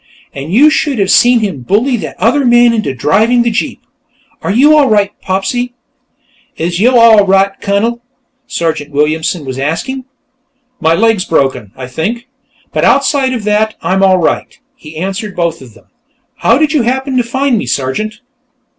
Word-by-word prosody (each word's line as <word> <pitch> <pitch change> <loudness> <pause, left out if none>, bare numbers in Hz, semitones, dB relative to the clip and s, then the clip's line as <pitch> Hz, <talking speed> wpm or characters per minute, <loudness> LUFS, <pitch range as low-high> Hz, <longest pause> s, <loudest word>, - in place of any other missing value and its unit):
And 140 +4 -7
you 285 +10 +5
should 295 -4 0
have 195 -2 +1
seen 245 -1 +4
him 195 -10 -3
bully 225 - +1
that - - -7
other 240 +9 +2
man 240 -1 +4
into 215 -11 -1
driving 215 - +2
the 235 - 0
jeep. 220 - -3 0.6
Are - - -4
you 275 +10 +4
all 290 -4 +4
right, 205 -2 +2
Popsy?" 245 +6 -2 0.8
"Is 170 +2 -2
yo' 245 +4 +4
all 220 -3 +6
right, 195 +1 +3
Cunnel?" 225 +4 -1 0.5
Sergeant 160 -3 -3
Williamson 155 +2 -1
was 130 0 -5
asking. 250 - -3 0.7
"My 160 +1 +2
leg's 220 -1 +1
broken, 130 -9 -1
I 130 - -7
think, 210 - -4 0.5
but - - -1
outside 275 -1 +2
of 235 -4 -4
that 210 +1 0
I'm 190 +1 0
all 190 -1 +4
right," 170 - -2 0.2
he 155 0 -12
answered 195 +4 -4
both 170 -3 -2
of 125 -4 -14
them. - - -20 0.5
"How 230 - +2
did 310 +1 +1
you 300 - +2
happen 260 +3 -2
to 245 - +2
find 265 +2 -1
me, - - -5
Sergeant?" 215 - -3
210 Hz, 170 wpm, -12 LUFS, 165-245 Hz, 0.8 s, all